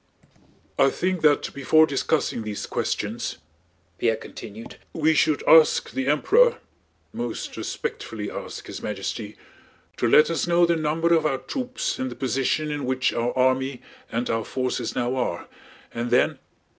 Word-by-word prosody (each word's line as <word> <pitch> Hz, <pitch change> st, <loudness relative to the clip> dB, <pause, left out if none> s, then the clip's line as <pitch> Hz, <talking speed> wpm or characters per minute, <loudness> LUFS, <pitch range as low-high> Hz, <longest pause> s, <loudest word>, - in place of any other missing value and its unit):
"I 135 Hz, -, +6 dB
think 185 Hz, +3 st, -1 dB
that 150 Hz, -2 st, +3 dB
before 155 Hz, +3 st, +4 dB
discussing 145 Hz, -3 st, -1 dB
these 105 Hz, -2 st, -5 dB
questions," -, -, -3 dB, 0.6 s
Pierre 115 Hz, -1 st, +2 dB
continued, 110 Hz, 0 st, -10 dB, 0.2 s
"we 160 Hz, 0 st, +2 dB
should 150 Hz, -1 st, +2 dB
ask 160 Hz, -1 st, +6 dB
the 130 Hz, 0 st, -2 dB
Emperor—most 435 Hz, -, 0 dB
respectfully 470 Hz, -, -5 dB
ask -, -, -7 dB
His -, -, -7 dB
Majesty—to -, -, -6 dB
let 465 Hz, +1 st, +6 dB
us -, -, -1 dB
know 175 Hz, 0 st, +4 dB
the 170 Hz, 0 st, +2 dB
number 165 Hz, +2 st, +1 dB
of 160 Hz, -2 st, +3 dB
our 135 Hz, -3 st, 0 dB
troops 255 Hz, -, -4 dB
and 130 Hz, -, -2 dB
the 120 Hz, -, -8 dB
position 135 Hz, +4 st, -1 dB
in 145 Hz, -1 st, -3 dB
which 130 Hz, 0 st, +1 dB
our 120 Hz, +1 st, 0 dB
army 130 Hz, 0 st, +1 dB, 0.3 s
and 120 Hz, +2 st, -1 dB
our 115 Hz, 0 st, 0 dB
forces 130 Hz, +1 st, -3 dB
now 125 Hz, +1 st, 0 dB
are, 120 Hz, -9 st, -2 dB, 0.5 s
and 120 Hz, +1 st, -3 dB
then..." 125 Hz, +1 st, +2 dB
140 Hz, 145 wpm, -24 LUFS, 125-160 Hz, 0.6 s, I